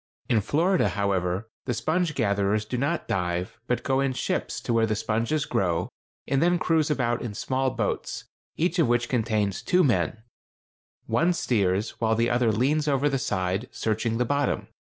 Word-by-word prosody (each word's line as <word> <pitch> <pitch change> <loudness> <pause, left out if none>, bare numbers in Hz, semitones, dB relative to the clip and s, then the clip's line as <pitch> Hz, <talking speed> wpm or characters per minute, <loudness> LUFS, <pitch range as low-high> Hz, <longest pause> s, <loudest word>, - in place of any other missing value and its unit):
In 110 -3 +3
Florida, 170 - +2
however, 100 0 -1 0.2
the 125 - -1
sponge 170 +5 0
gatherers 100 -2 +1
do 115 - -4
not 140 +7 -1
dive, 90 -1 -2
but 125 -1 0
go 135 -1 +1
in 135 -1 +1
ships - - -2
to 120 - -2
where 115 -1 +3
the 110 - 0
sponges 115 +8 0
grow, 90 - 0 0.4
and 135 0 +1
then 175 +1 +3
cruise 160 -3 +1
about 120 -5 0
in 110 -4 -5
small 130 +5 0
boats, 115 -5 -3 0.3
each 175 +2 +1
of 165 - +4
which 120 0 +1
contains 110 -5 0
two 180 0 +3
men: 115 -3 +1 0.8
one 175 +2 +2
steers, 100 - 0
while 110 -1 +2
the 115 +1 +1
other 120 -2 +3
leans 145 +8 +1
over 145 0 +2
the 135 -1 0
side 95 0 -1
searching 110 +1 -1
the 125 - +1
bottom. 145 +2 0
120 Hz, 170 wpm, -26 LUFS, 105-140 Hz, 0.8 s, of